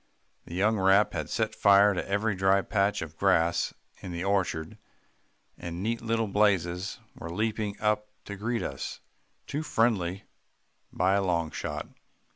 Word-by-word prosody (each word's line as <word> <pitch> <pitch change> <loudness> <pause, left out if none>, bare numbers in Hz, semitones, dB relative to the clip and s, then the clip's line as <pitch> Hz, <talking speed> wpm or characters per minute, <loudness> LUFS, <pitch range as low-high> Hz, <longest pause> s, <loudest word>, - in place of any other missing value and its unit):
The 85 - -8
young 105 +3 +2
rap 95 +2 +4
had - - -3
set - - -1
fire 100 0 +5
to 95 - -4
every 100 +2 +1
dry 95 +1 +3
patch 100 -3 +1
of 80 0 -10
grass 85 -3 +2 0.3
in 90 - -6
the 85 +1 -4
orchard, 95 -1 -1 0.8
and 85 +1 -5
neat 115 +2 -1
little 115 0 0
blazes 95 -3 +1 0.2
were 85 - -8
leaping 105 +2 -2
up 105 0 +1 0.2
to 100 - -6
greet 115 +4 -2
us - - -5 0.5
too 145 +2 -3
friendly 100 - 0 0.7
by 95 +2 +2
a 100 0 +2
long 85 -4 0
shot." 75 0 -4
100 Hz, 150 wpm, -28 LUFS, 90-105 Hz, 0.8 s, fire